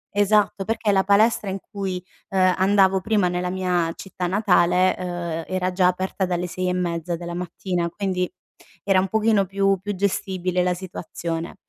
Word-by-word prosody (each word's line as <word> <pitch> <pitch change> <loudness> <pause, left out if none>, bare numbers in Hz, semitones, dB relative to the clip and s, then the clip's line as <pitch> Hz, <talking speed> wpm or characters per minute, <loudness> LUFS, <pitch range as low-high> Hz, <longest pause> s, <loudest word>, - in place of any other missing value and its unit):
Esatto, 205 -1 +2
perché 220 -1 0
la 190 -1 +2
palestra 205 +1 +3
in 190 +1 -3
cui, 190 -3 -3 0.3
uhm, 185 -1 +3
andavo 190 0 +4
prima 205 -1 +1
nella 180 0 -2
mia 180 -2 0
città 185 -2 -5
natale, 185 -2 +3
uhm, 175 -2 -3
era 185 0 -1
già 180 0 +3
aperta 185 +1 -1
dalle 180 0 -2
6 185 +1 -3
e 180 - +1
mezza 175 -1 -2
della 170 +1 -6
mattina, 175 0 -3
quindi 185 -1 -2 0.5
era 195 -2 +3
un 190 - 0
pochino 215 0 +2
più 195 0 +1
più 205 0 -3
gestibile 185 -2 -1
la 180 0 +1
situazione. 170 -2 -5
185 Hz, 165 wpm, -23 LUFS, 180-195 Hz, 0.5 s, andavo